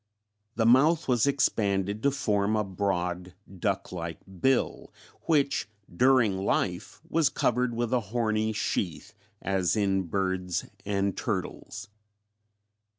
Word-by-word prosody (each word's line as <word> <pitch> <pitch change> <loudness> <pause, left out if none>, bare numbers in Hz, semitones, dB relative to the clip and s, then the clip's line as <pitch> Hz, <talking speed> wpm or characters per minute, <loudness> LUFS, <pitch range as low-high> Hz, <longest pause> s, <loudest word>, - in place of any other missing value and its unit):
The 115 - +1
mouth 150 +8 +4
was 125 0 +3
expanded 100 -7 +1
to 140 - +3
form 110 -6 0
a 105 - +1
broad 90 -2 -2 0.2
duck 100 0 -1
like 85 -3 -5 0.2
bill 135 -1 +1 0.4
which 140 -9 +1 0.3
during 120 -4 +4
life 90 -1 -1
was 165 -4 +2
covered 125 -2 0
with 120 +1 -1
a 125 - +4
horny 110 -2 0
sheath, 95 -2 -3 0.3
as 95 -1 +1
in 95 -3 +1
birds 95 -1 -1 0.2
and 100 -1 0
turtles. - - -4
105 Hz, 115 wpm, -28 LUFS, 95-125 Hz, 0.4 s, mouth